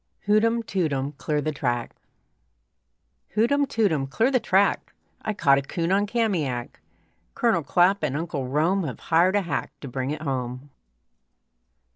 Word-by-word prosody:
HOOTEM, 230 +3 +2
TOOTEM, 145 -10 -1
CLEAR 150 -1 -1
THE 155 - -1
TRACK 120 -5 -2 1.4
Hootem, 280 +6 +2
tootem, 165 - +1
clear 230 - +1
the 255 - +3
track! 195 -2 +1 0.3
I 215 - -3
caught 140 -7 +4
a - - -3
coon 165 +5 -3
on 200 +2 +2
Kamiak! 170 - -1 0.5
Colonel 230 -9 +2
Clapp 180 +6 +3
and 145 -2 -1
Uncle 150 -5 -3
Rome 165 +8 +1
Have 130 - -5
hired 175 +4 +3
a 205 - +2
hack 160 -5 -3
to 140 - -7
bring 130 +1 -3
it 155 +1 -4
home. 130 0 -4
165 Hz, 145 wpm, -25 LUFS, 140-205 Hz, 1.4 s, caught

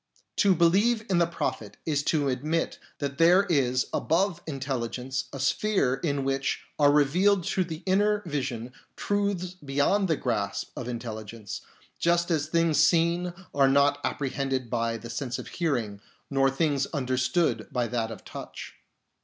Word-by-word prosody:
To 200 -3 +4
believe 205 +7 +3
in 175 - +4
the 170 - +3
Prophet 170 - -4
is 150 -3 +1
to 150 -3 +1
admit 150 +6 -1 0.2
that 140 -1 -4
there 175 +4 +6
is 130 -9 +1
above 175 +1 +1
intelligence 130 -2 -3
a 135 - -7
sphere 135 -2 +1
in 140 -4 0
which 135 0 -1 0.2
are 145 -1 +6
revealed 175 +7 +3
to 185 - +1
the 165 -1 -7
inner 205 +2 +2
vision 130 -6 -3 0.2
truths 200 -3 -1
beyond 145 +9 +2
the 160 - +2
grasp 105 -5 -2
of 120 - -5
intelli 115 -3 -5
gence, 105 -2 -7 0.4
just 170 +1 +2
as 155 -2 +1
things 165 -2 +2
seen 170 +2 +3 0.2
are 140 -1 +4
not 140 +1 +4
apprehended 135 -3 -2
by 115 -1 0
the 115 +1 -8
sense 125 0 -3
of - - -7
hearing, 120 - -2 0.3
nor 135 0 +3
things 140 0 0
understood 130 +3 0
by 125 -3 0
that 115 -1 -2
of 110 - -9
touch. - - -8
145 Hz, 155 wpm, -27 LUFS, 130-170 Hz, 0.4 s, there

